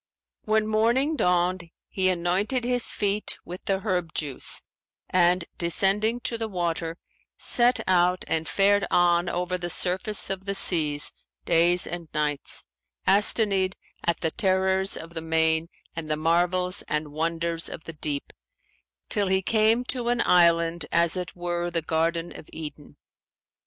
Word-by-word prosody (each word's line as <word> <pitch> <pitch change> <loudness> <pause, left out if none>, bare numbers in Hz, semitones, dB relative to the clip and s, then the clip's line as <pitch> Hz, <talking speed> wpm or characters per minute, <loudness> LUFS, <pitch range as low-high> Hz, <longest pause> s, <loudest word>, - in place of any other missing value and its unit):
When 215 0 +2
morning 235 +8 +2
dawned, 180 - 0 0.2
he 185 -1 0
anointed 185 +8 0
his 245 0 -1
feet 205 +1 -2
with 180 +1 -8
the 195 -1 -1
herb 180 -6 -2
juice 145 -4 -1 0.5
and 175 -1 +3
descending 205 +7 +2
to 230 -1 -3
the 225 - -2
water, 170 -3 -3 0.4
set 245 +1 +3
out 180 0 +2
and 160 0 -1
fared 200 0 +3
on 175 0 +2
over 180 +1 -2
the 175 0 -4
surface 190 +4 0
of 190 0 -5
the 200 0 -2
seas 150 -6 +2 0.3
days 175 +1 +4
and 170 -2 -6
nights, 150 -2 -1 0.4
astonied 195 -1 +3 0.3
at 170 -1 -1
the 160 - 0
terrors 190 +1 +2
of 165 +1 -9
the 165 - -5
main 160 0 +1 0.3
and 165 -2 -6
the 155 - 0
marvels 180 +3 +2
and 150 0 -2
wonders 165 +1 -1
of 160 - -8
the 165 - -8
deep, 150 -2 -4 0.7
till 205 -3 0
he 190 0 +1
came 220 +4 +2
to 245 -2 -2
an 240 -1 +1
island 170 -2 +3
as 170 0 +3
it 180 -1 -4
were 175 0 -3
the 170 -2 -2
Garden 165 +1 -1
of - - -12
Eden. 150 -2 -9
180 Hz, 145 wpm, -25 LUFS, 165-195 Hz, 0.7 s, days